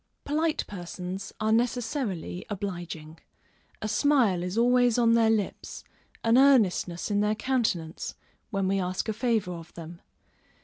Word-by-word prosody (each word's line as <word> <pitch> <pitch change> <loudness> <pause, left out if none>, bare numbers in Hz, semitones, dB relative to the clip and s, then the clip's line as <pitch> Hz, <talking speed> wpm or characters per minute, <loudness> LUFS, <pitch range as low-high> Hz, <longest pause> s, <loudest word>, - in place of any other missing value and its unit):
_ - - -51
Polite 310 +2 0
persons 180 0 -6
are 220 0 +1
necessarily 230 - -1
obliging. 175 -6 -6 0.6
A - - -1
smile 235 -6 +3
is 180 +4 -3
always 245 0 +4
on 230 -1 +4
their 230 -1 +4
lips, 215 -3 -2 0.4
an 230 +2 +5
earnestness 210 -9 +3
in 205 - +2
their 210 +1 +2
countenance, 215 -10 -1 0.3
when 195 -3 -1
we 195 +1 +1
ask 185 +2 -2
a - - 0
favor 225 -4 0
of 165 -1 -10
them. 170 +1 -9
210 Hz, 140 wpm, -27 LUFS, 180-240 Hz, 0.6 s, an